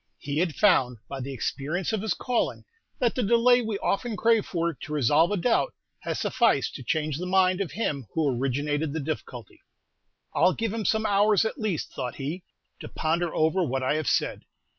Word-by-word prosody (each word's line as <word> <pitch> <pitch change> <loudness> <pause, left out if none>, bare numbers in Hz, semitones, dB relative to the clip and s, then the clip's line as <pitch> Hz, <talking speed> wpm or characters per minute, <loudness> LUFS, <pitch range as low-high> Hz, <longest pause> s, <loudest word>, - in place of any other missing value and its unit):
He 145 +1 -3
had 170 -3 0
found, 130 - +3
by 135 -1 -6
the 135 +2 -5
experience 150 - -2
of 215 - 0
his 215 -4 -1
calling, 250 -2 -1 0.3
that 240 -3 +1
the 255 - -1
delay 235 +3 +4
we 220 -3 -2
often 215 +3 -1
crave 225 -2 +3
for, 170 -1 -1
to 155 - -10
resolve 150 +3 +3
a 205 - 0
doubt, 235 - +1 0.2
has - - -3
sufficed 225 - +2
to 130 - -8
change 155 +3 -1
the 180 - -4
mind 185 0 +3
of 190 - -3
him 145 - -2
who 145 -5 +1
originated 145 +4 -1
the 160 - -2
difficulty. 135 - -6 0.7
"I'll 185 - +4
give 225 -2 -2
him 225 -2 -3
some 220 0 +1
hours, 205 +1 +3
at 220 - -3
least," 205 -8 -2
thought 125 -2 -4
he, 150 +7 -4 0.4
"to - - -8
ponder 165 +1 -1
over 160 +4 +2
what 135 -3 -1
I 130 - +1
have 155 -1 -2
said. - - 0
170 Hz, 195 wpm, -26 LUFS, 145-215 Hz, 0.7 s, delay